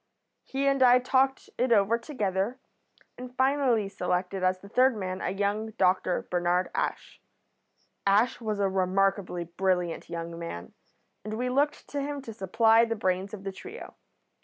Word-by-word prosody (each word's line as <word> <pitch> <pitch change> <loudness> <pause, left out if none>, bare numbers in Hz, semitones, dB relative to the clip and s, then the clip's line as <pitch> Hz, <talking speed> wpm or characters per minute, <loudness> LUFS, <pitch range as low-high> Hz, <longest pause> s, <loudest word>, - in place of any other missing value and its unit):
He 275 +1 -2
and 275 -1 +2
I 250 -1 +7
talked 265 +1 +1
it 250 0 +1
over 220 +1 +4
together, 215 -3 -2 0.6
and 250 0 -9
finally 260 -5 +2
selected 180 0 -2
as 185 0 +2
the 200 - -14
third 255 +3 +3
man 185 -1 -4
a - - -1
young 205 +3 -2
doctor, 185 -1 +1
Bernard 175 +1 +1
Ash. - - -3 0.9
Ash 210 +6 +3
was 215 -2 -2
a 200 - +2
remarkably 190 -1 0
brilliant 175 -1 -1
young 170 0 -5
man, 90 - -7 0.5
and 215 +1 -5
we 250 +2 -1
looked 285 +3 0
to 285 - -3
him 285 0 -3
to 225 - -8
supply 225 +3 +4
the 230 -1 -1
brains 190 -1 -1
of 205 -2 -8
the 195 - -3
trio. 400 - -10
205 Hz, 160 wpm, -28 LUFS, 185-250 Hz, 0.9 s, I